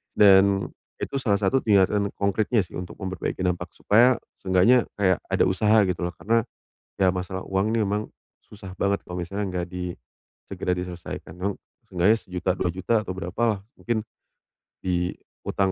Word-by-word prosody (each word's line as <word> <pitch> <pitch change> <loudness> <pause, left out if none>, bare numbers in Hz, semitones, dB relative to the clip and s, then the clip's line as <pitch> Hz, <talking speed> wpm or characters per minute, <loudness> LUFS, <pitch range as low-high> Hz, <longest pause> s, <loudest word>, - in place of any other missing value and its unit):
Dan, 100 -1 +5 0.3
itu 140 - -2
salah 120 -7 +1
satu 100 +7 +3
tindakan 100 -1 +3
konkritnya 105 +3 +1
sih, 90 - -8
untuk 90 0 -6
memperbaiki 95 -1 -3
dampak. 90 -1 -2
Supaya, 120 +4 +4 0.2
seenggaknya 95 +6 +4
kayak 95 -3 +3 0.2
ada - - +4
usaha, 105 +3 +4
gitu 90 -1 -1
loh. 90 - -4
Karena, 115 +4 +1 0.5
ya 95 - +4
masalah 95 0 -4
uang 95 +3 +1
ini 115 -2 +2
memang 105 +1 0 0.4
susah 95 -3 -11
banget 100 0 +1
kalau 90 0 -5
misalnya 100 +3 -3
nggak 90 -1 -3
di 90 -1 -4 0.5
segera 90 - -2
diselesaikan. 90 -2 -7
Kamu, 100 +1 -1 0.3
seenggaknya 95 +5 +3
Rp.1.000.000, 90 0 -2
Rp.2.000.000, 95 +5 0
atau 95 -3 -5
berapalah. 100 +3 -1 0.2
Mungkin 115 -2 -1 0.8
di 90 -1 0 0.3
utang 95 -1 +1
95 Hz, 155 wpm, -25 LUFS, 90-105 Hz, 0.8 s, Dan